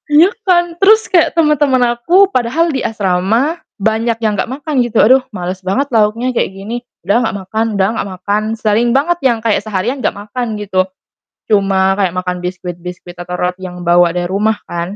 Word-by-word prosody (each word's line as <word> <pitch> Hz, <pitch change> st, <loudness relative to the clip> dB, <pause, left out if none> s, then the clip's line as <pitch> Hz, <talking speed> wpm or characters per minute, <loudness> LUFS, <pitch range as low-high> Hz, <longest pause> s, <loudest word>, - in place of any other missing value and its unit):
Iya 315 Hz, +6 st, +6 dB
kan? 345 Hz, -3 st, +2 dB
Terus 440 Hz, +3 st, +5 dB
kayak 340 Hz, -1 st, +2 dB
temen-temen 275 Hz, -6 st, +3 dB
aku, 355 Hz, +11 st, +4 dB
padahal 285 Hz, +7 st, +1 dB
di 265 Hz, -, -1 dB
asrama 220 Hz, -, 0 dB, 0.2 s
banyak 220 Hz, +2 st, 0 dB
yang 220 Hz, -2 st, 0 dB
nggak 205 Hz, -, -2 dB
makan 280 Hz, 0 st, -1 dB
gitu. 240 Hz, -2 st, -1 dB
"Aduh, 255 Hz, +4 st, +5 dB
males 185 Hz, -1 st, -5 dB
banget 195 Hz, +10 st, 0 dB
lauknya 225 Hz, +4 st, +1 dB
kayak -, -, 0 dB
gini, 205 Hz, +5 st, -6 dB, 0.2 s
udah 235 Hz, +5 st, +3 dB
nggak 220 Hz, -, -2 dB
makan 220 Hz, +4 st, -1 dB
udah 190 Hz, 0 st, +3 dB
nggak 200 Hz, -, -3 dB
makan." 205 Hz, +3 st, -1 dB, 0.2 s
Sering 220 Hz, +2 st, +1 dB
banget 295 Hz, +8 st, +1 dB
yang 245 Hz, -4 st, +2 dB
kayak 220 Hz, -2 st, 0 dB
seharian 215 Hz, +6 st, -3 dB
nggak -, -, -1 dB
makan, 215 Hz, +2 st, -4 dB
gitu. 190 Hz, -2 st, 0 dB, 0.7 s
Cuma 195 Hz, -1 st, +2 dB
kayak 185 Hz, -3 st, 0 dB
makan 180 Hz, 0 st, -3 dB
biskuit-biskuit 180 Hz, 0 st, -7 dB
atau 180 Hz, 0 st, -5 dB
roti 180 Hz, +1 st, -3 dB
yang 180 Hz, 0 st, -9 dB
bawa 175 Hz, 0 st, +3 dB
dari 175 Hz, -, -1 dB
rumah 215 Hz, +3 st, +1 dB, 0.2 s
kan 175 Hz, +3 st, -4 dB
215 Hz, 180 wpm, -15 LUFS, 190-255 Hz, 0.7 s, Iya